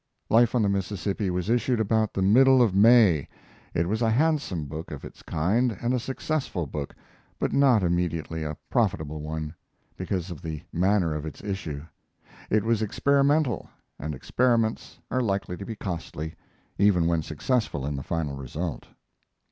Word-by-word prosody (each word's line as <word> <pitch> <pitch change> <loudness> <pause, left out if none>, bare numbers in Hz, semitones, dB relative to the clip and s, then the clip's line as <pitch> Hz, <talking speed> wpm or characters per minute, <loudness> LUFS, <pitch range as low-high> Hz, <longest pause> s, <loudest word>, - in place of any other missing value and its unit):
Life 120 +2 +5
on 120 - +3
the - - +3
Mississippi 100 0 -1
was 90 0 -2
issued 120 +1 +1
about 110 0 +1
the 95 - +1
middle 130 +6 +6
of 110 -5 +1
May. 100 - +6 0.5
It 85 +1 +1
was 110 +5 -1
a 115 - +3
handsome 135 - +1
book 80 +3 -7
of 75 - -7
its - - -12
kind 105 +8 0
and 120 +1 0
a 125 - +1
successful 130 - -2
book, 70 0 -5 0.4
but - - -1
not 130 -7 +4
immediately 85 -2 -1
a 75 -1 -4
profitable 80 - 0
one, 80 0 -4 0.4
because 95 -1 -3
of 80 - -8
the 80 -1 -5
manner 90 -2 +2
of 75 -1 -4
its 80 +4 -8
issue. 90 -8 -4 0.7
It 110 -2 +2
was 115 -1 +1
experimental, 140 - +2 0.3
and 75 +1 -4
experiments 115 - 0
are 130 - +1
likely 100 -5 -1
to 100 - -8
be 115 - -4
costly, 80 -5 -5 0.5
even 95 -4 +4
when 85 -1 +2
successful 80 - -1
in 75 0 -2
the 70 - -4
final 75 -1 -2
result. 70 +3 -5
95 Hz, 165 wpm, -26 LUFS, 80-115 Hz, 0.7 s, middle